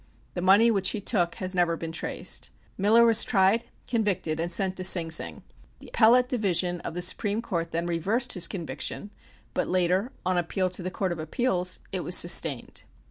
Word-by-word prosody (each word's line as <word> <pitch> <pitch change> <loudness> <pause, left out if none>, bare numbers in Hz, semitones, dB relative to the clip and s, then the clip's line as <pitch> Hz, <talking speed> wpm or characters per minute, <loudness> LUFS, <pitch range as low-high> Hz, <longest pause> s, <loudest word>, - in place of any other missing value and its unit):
The 175 - -4
money 200 +6 +5
which 195 -3 +1
he 215 - -4
took 180 -4 -1
has 185 0 -3
never 175 -2 0
been 165 0 -6
traced. 165 - -4 0.3
Miller 220 +4 +4
was 230 0 +6
tried, 205 +2 +1 0.2
convicted 200 -9 -2
and 170 +1 -3
sent 190 -1 +2
to 185 - -2
Sing 170 -3 +3
Sing. - - -1 0.3
The - - -14
Appellate 245 +2 +4
Division 185 - -1
of 160 - -7
the 180 - -1
Supreme 205 +3 +1
Court 170 -8 -4
then 170 +1 -3
reversed 200 +9 -1
his 175 -2 +1
conviction, 195 +3 -5 0.4
but - - -2
later, 185 +6 0
on 185 -1 +1
appeal 185 +2 -2
to 185 - -4
the 180 - -4
Court 185 0 -3
of 170 - -5
Appeals, 180 - -1
it 190 - -3
was 180 - +4
sustained. 160 -6 +3
185 Hz, 190 wpm, -26 LUFS, 175-210 Hz, 0.4 s, was